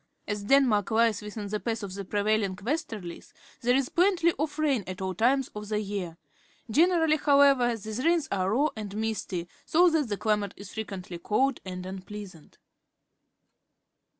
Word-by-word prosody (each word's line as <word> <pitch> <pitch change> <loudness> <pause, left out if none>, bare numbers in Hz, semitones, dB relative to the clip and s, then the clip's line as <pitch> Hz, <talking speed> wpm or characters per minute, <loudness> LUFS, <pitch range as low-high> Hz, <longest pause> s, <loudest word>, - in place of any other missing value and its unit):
As 205 -1 -3
Denmark 240 -5 +4
lies 225 -2 +2
within 210 0 -6
the 210 +1 -2
path 225 -1 -3
of 195 -2 -5
the 200 +1 -5
prevailing 205 0 0
westerUes, 210 - -5 0.3
there 245 +1 +3
is 270 -1 +1
plenty 350 -2 +3
of 295 0 -2
rain 285 -8 +1
at 185 -1 -6
all 190 0 -2
times 255 +7 +2
of 210 0 -8
the 210 -1 0
year. 195 -5 -4 0.5
Generally, 320 +2 +4
however, 280 -5 +4
these 220 +4 -5
rains 335 -2 +2
are 190 -1 0
raw 275 +9 +2
and 210 -2 -6
misty, 215 -5 -3 0.2
so 350 +2 +4
that 305 -6 +1
the 205 - -2
cUmate 210 -2 0
is 200 -1 -10
frequently 190 -5 -6
cold 260 +9 +1
jind 180 -1 -6
unpleasant. 190 -2 -9
215 Hz, 160 wpm, -28 LUFS, 200-275 Hz, 0.5 s, Denmark